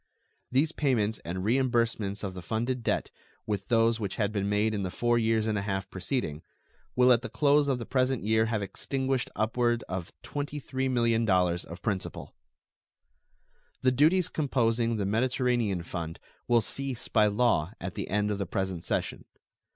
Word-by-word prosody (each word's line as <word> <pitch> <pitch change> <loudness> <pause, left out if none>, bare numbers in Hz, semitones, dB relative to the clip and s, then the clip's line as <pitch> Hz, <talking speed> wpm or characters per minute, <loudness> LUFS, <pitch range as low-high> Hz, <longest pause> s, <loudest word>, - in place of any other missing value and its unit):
These 140 +5 +3
payments 110 -7 +1
and 90 +2 -5
reimbursements 115 -4 +1
of 95 -2 -3
the 90 - -7
funded 120 +7 -2
debt, - - -1 0.3
with 100 -2 -3
those 115 -1 +3
which 100 -3 -3
had 105 -1 0
been 100 -1 -1
made 105 +2 +2
in 105 - -1
the 95 - -2
four 120 +5 +1
years 110 -1 +2
and 110 -2 0
a - - -2
half 95 -1 -3
preceding, 90 - -2 0.5
will 125 0 +6
at 120 - +2
the 125 - -6
close 145 0 +3
of 135 -2 +1
the 115 - -6
present 130 -3 +1
year 110 +1 +3
have 110 -2 -1
extinguished 130 +5 -2
upward 120 +2 +1
of 90 -2 -4
$23 140 -2 -3
millions 110 -8 +2
of 85 +1 -10
principal. 100 -4 -3 1.5
The 130 - +5
duties 160 +7 +4
composing 115 -5 +1
the 100 - -1
Mediterranean 120 -3 +1
fund 85 -1 -5 0.3
will 120 -1 +4
cease 135 +2 -4
by 105 -2 +4
law 105 -5 +2
at 90 +1 -5
the - - -4
end 105 +1 0
of 100 - -2
the 100 - -2
present 95 -2 -2
session. - - -2
115 Hz, 165 wpm, -29 LUFS, 100-125 Hz, 1.5 s, will